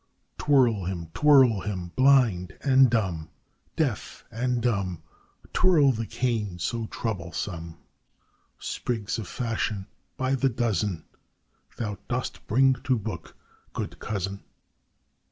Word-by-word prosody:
Twirl 125 Hz, -9 st, +3 dB
him! 85 Hz, -3 st, -4 dB
twirl 130 Hz, -, +6 dB
him! 90 Hz, -4 st, -4 dB
blind 125 Hz, -10 st, +4 dB
and 135 Hz, -2 st, +5 dB
dumb 95 Hz, -9 st, -1 dB, 0.5 s
Deaf -, -, -2 dB
and 125 Hz, +2 st, 0 dB
dumb, 100 Hz, -8 st, -1 dB, 0.5 s
Twirl 160 Hz, -7 st, +5 dB
the 115 Hz, -2 st, -3 dB
cane 115 Hz, -5 st, -1 dB
so 115 Hz, +6 st, -2 dB
troublesome! 85 Hz, -6 st, -4 dB, 0.8 s
Sprigs 115 Hz, -1 st, -3 dB
of 105 Hz, -, -6 dB
fashion 110 Hz, -3 st, -2 dB, 0.3 s
by 130 Hz, +1 st, 0 dB
the 135 Hz, 0 st, +2 dB
dozen 105 Hz, -8 st, -1 dB, 0.7 s
Thou 105 Hz, -4 st, -3 dB
dost -, -, -4 dB
bring 135 Hz, +4 st, +5 dB
to 130 Hz, -2 st, +2 dB
book, 100 Hz, -7 st, -6 dB, 0.4 s
good -, -, -5 dB
cousin. 100 Hz, -1 st, -4 dB
110 Hz, 110 wpm, -26 LUFS, 95-125 Hz, 0.8 s, twirl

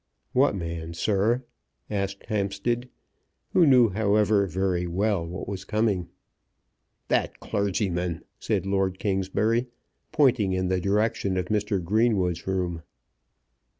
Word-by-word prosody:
"What 130 Hz, -4 st, +3 dB
man, 85 Hz, -2 st, -5 dB
sir?" 110 Hz, +7 st, +1 dB, 0.4 s
asked 100 Hz, -1 st, -3 dB
Hampstead, 110 Hz, +4 st, -1 dB, 0.6 s
who 170 Hz, -3 st, +5 dB
knew, 125 Hz, -4 st, +6 dB
however, 105 Hz, 0 st, +2 dB
very 90 Hz, 0 st, -1 dB
well 95 Hz, +1 st, 0 dB
what 90 Hz, +3 st, -6 dB
was 100 Hz, -1 st, -5 dB
coming. 105 Hz, -5 st, 0 dB, 1.0 s
"That -, -, 0 dB
clergyman," 90 Hz, -4 st, -1 dB, 0.2 s
said -, -, -1 dB
Lord 95 Hz, -1 st, 0 dB
Kingsbury, 105 Hz, +5 st, 0 dB, 0.4 s
pointing 125 Hz, -11 st, +3 dB
in 95 Hz, 0 st, 0 dB
the 95 Hz, -1 st, +1 dB
direction 100 Hz, 0 st, +1 dB
of 90 Hz, -1 st, -2 dB
Mr. 105 Hz, -2 st, 0 dB
Greenwood's 95 Hz, -3 st, +1 dB
room. 90 Hz, -3 st, -1 dB
100 Hz, 115 wpm, -26 LUFS, 90-110 Hz, 1.0 s, knew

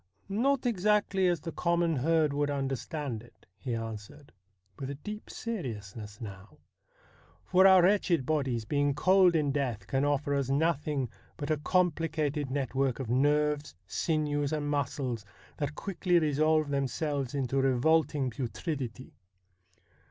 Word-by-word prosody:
' -, -, -36 dB, 0.2 s
Not 275 Hz, -2 st, +2 dB
exactly 205 Hz, -3 st, +2 dB
as 175 Hz, -3 st, +1 dB
the 165 Hz, -, -5 dB
common 170 Hz, -2 st, +1 dB
herd 155 Hz, +2 st, +2 dB
would 145 Hz, 0 st, 0 dB
understand 135 Hz, -2 st, -3 dB
it,' 120 Hz, -, -20 dB
he 125 Hz, -4 st, -3 dB
answered, 115 Hz, +4 st, -7 dB, 0.5 s
with 135 Hz, -, -4 dB
a 140 Hz, -, -4 dB
deep 210 Hz, +9 st, -8 dB
seriousness 110 Hz, -, -6 dB
now, 100 Hz, -4 st, -10 dB, 0.4 s
' 85 Hz, +4 st, -30 dB
for 190 Hz, +1 st, +7 dB
our 190 Hz, -2 st, +7 dB
wretched 180 Hz, -6 st, +3 dB
bodies 130 Hz, -7 st, 0 dB
being 145 Hz, +2 st, +1 dB
cold 185 Hz, +1 st, +5 dB
in 150 Hz, -3 st, +2 dB
death 125 Hz, -8 st, -2 dB
can 135 Hz, +7 st, 0 dB
offer 145 Hz, 0 st, +1 dB
us 140 Hz, -2 st, 0 dB
nothing 145 Hz, -2 st, +1 dB, 0.3 s
but 145 Hz, 0 st, -3 dB
a 155 Hz, -, +2 dB
compli 165 Hz, +1 st, +1 dB
cated 150 Hz, -2 st, -1 dB
network 135 Hz, -1 st, -1 dB
of 125 Hz, -4 st, -3 dB
nerves, 150 Hz, -, +1 dB
sinews, 145 Hz, -, -1 dB
and 145 Hz, -2 st, -1 dB
muscles 135 Hz, -5 st, -2 dB, 0.3 s
that 145 Hz, 0 st, -3 dB
quickly 180 Hz, -1 st, 0 dB
resolve 155 Hz, -1 st, +2 dB
themselves 140 Hz, 0 st, -1 dB
into 135 Hz, 0 st, 0 dB
revolting 135 Hz, +1 st, +2 dB
putridity. 130 Hz, 0 st, -4 dB
145 Hz, 140 wpm, -30 LUFS, 130-160 Hz, 0.5 s, for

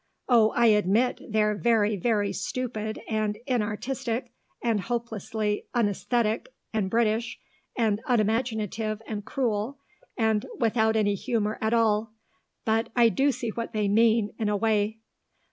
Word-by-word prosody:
Oh, 230 Hz, -4 st, +5 dB
I 240 Hz, -, +4 dB
admit 215 Hz, +3 st, +3 dB
they're 210 Hz, -1 st, +2 dB
very, 215 Hz, -1 st, +2 dB
very 205 Hz, 0 st, 0 dB
stupid 220 Hz, -4 st, -4 dB
and 215 Hz, -2 st, -1 dB
inartistic, 240 Hz, +1 st, -2 dB, 0.3 s
and 230 Hz, -3 st, +1 dB
hopelessly 220 Hz, -1 st, -3 dB
unaesthetic 230 Hz, -, 0 dB, 0.2 s
and 210 Hz, -4 st, 0 dB
British 225 Hz, +1 st, 0 dB, 0.4 s
and 220 Hz, -3 st, +1 dB
unimaginative 220 Hz, -2 st, 0 dB
and 210 Hz, -1 st, -5 dB
cruel 235 Hz, +2 st, -2 dB, 0.4 s
and 220 Hz, -3 st, +1 dB
without 220 Hz, -1 st, +2 dB
any 205 Hz, -2 st, +2 dB
humour 215 Hz, +1 st, -1 dB
at 220 Hz, +2 st, +2 dB
all 220 Hz, -1 st, +1 dB, 0.5 s
but 225 Hz, +1 st, +1 dB
I 235 Hz, -2 st, +6 dB
do 275 Hz, +5 st, +2 dB
see 245 Hz, -2 st, -4 dB
what 230 Hz, +1 st, -5 dB
they 210 Hz, -1 st, +1 dB
mean, 220 Hz, 0 st, +3 dB
in 215 Hz, -2 st, 0 dB
a 205 Hz, -, +1 dB
way." 215 Hz, 0 st, 0 dB
220 Hz, 130 wpm, -27 LUFS, 210-235 Hz, 0.5 s, I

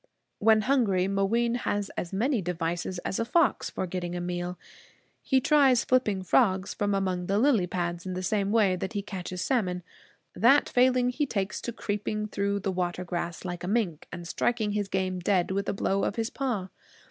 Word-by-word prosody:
When 220 Hz, 0 st, +5 dB
hungry, 210 Hz, -7 st, +2 dB
Mooween 210 Hz, +5 st, +1 dB
has 205 Hz, -4 st, -2 dB
as 170 Hz, -, -4 dB
many 230 Hz, +4 st, +1 dB
devices 175 Hz, +1 st, -2 dB
as -, -, -2 dB
a -, -, +2 dB
fox 290 Hz, +6 st, +2 dB
for -, -, -3 dB
getting 175 Hz, -1 st, -4 dB
a -, -, -2 dB
meal. 175 Hz, 0 st, -3 dB, 0.6 s
He 265 Hz, -, +2 dB
tries 270 Hz, -3 st, +4 dB
flipping 215 Hz, -7 st, +1 dB
frogs 190 Hz, -2 st, +2 dB
from 205 Hz, -1 st, 0 dB
among 185 Hz, -2 st, -1 dB
the 195 Hz, -, +1 dB
lily 225 Hz, -6 st, +3 dB
pads 175 Hz, -1 st, -3 dB
in 185 Hz, -, -3 dB
the 185 Hz, -, -3 dB
same 200 Hz, +2 st, 0 dB
way 210 Hz, -5 st, +3 dB
that 190 Hz, +3 st, -4 dB
he 205 Hz, -1 st, -2 dB
catches 185 Hz, -2 st, -5 dB
salmon. 185 Hz, -9 st, 0 dB, 0.5 s
That 270 Hz, +6 st, +5 dB
failing, 250 Hz, -1 st, +3 dB
he 290 Hz, +3 st, -1 dB
takes 195 Hz, -5 st, -2 dB
to 235 Hz, -, -4 dB
creeping 210 Hz, -1 st, -3 dB
through 200 Hz, 0 st, -1 dB
the 195 Hz, -, -1 dB
water 180 Hz, -1 st, -2 dB
grass, 170 Hz, 0 st, -4 dB
like 175 Hz, -1 st, -5 dB
a -, -, -3 dB
mink, 195 Hz, -7 st, -1 dB
and 170 Hz, -1 st, -7 dB
striking 220 Hz, +2 st, 0 dB
his 205 Hz, -1 st, -1 dB
game 185 Hz, -1 st, -1 dB
dead 180 Hz, 0 st, +1 dB
with 200 Hz, +1 st, -1 dB
a -, -, +2 dB
blow 195 Hz, 0 st, 0 dB
of -, -, -1 dB
his 225 Hz, +1 st, -2 dB
paw. 235 Hz, -9 st, -2 dB
195 Hz, 195 wpm, -28 LUFS, 180-230 Hz, 0.6 s, When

